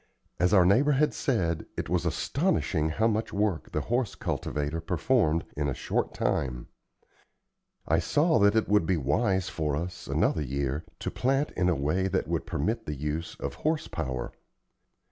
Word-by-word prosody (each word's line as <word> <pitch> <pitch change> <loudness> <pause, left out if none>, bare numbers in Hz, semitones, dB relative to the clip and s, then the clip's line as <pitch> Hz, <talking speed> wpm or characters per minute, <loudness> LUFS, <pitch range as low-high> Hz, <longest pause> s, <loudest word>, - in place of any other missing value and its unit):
As 90 0 +3
our 95 -4 +6
neighbor 130 +11 +4
had 150 +3 +2
said, 85 - -1
it - - -2
was 85 +1 0
astonishing 95 - 0
how 110 +8 0
much 110 0 0
work 100 -4 -1
the - - -1
horse 120 -2 -1
cultivator 75 +2 -2
performed 85 -1 +1
in 75 0 -1
a 65 - -2
short - - -1
time. 60 -3 -1 1.2
I 80 +2 +3
saw 145 - +2
that 100 +1 +4
it 110 - +2
would 105 -5 +3
be 90 - +2
wise 95 - +1
for 75 -3 -1
us, 85 +3 -5
another - - +1
year, 70 +2 -2 0.2
to - - -2
plant 135 +3 0
in 90 -1 +1
a 90 - +2
way 75 +8 0
that 95 - -1
would - - -2
permit 110 +10 -2
the 75 - -2
use 75 +4 -3
of - - -4
horse 155 0 0
power. 65 -2 -4
90 Hz, 170 wpm, -28 LUFS, 75-110 Hz, 1.2 s, our